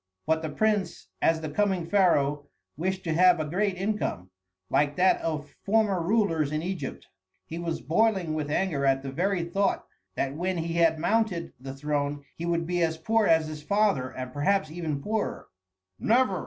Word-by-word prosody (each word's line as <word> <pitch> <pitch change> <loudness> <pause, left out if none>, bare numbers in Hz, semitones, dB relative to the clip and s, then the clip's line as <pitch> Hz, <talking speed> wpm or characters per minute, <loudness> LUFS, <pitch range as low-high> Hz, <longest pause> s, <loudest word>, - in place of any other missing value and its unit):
But 160 0 +1
the 160 - -3
prince, 205 +2 -1
as 160 0 +3
the 155 - -4
coming 190 0 +1
pharaoh, 150 -6 +2 0.3
wished 190 +4 -2
to 165 - -1
have 180 +1 +5
a 155 - -1
great 190 +5 0
income, 190 - -2 0.4
like 145 0 +2
that 185 +1 +3
of 150 -2 -3
former 205 -3 +2
rulers 165 -6 +1
in 155 +1 -2
Egypt. 185 0 -5 0.4
He 165 - -6
was 170 -4 -3
boiling 180 - +1
with 150 -2 -2
anger 155 -3 0
at 135 0 +2
the 135 - -5
very 180 +4 0
thought 195 +4 0 0.3
that 135 0 -1
when 180 +4 -2
he 165 0 -2
had 165 -1 +4
mounted 195 0 0
the 135 +1 -7
throne 145 0 -2
he 170 - -5
would 170 -1 0
be 175 +1 -1
as 160 -1 +1
poor 220 +6 +2
as 160 -1 +4
his 155 -1 -7
father 200 -7 +1
and 130 0 -7
perhaps 155 +2 +1
even 155 -4 -3
poorer. 220 0 -2 0.5
"Never!" 225 -5 +2
165 Hz, 180 wpm, -27 LUFS, 150-195 Hz, 0.5 s, have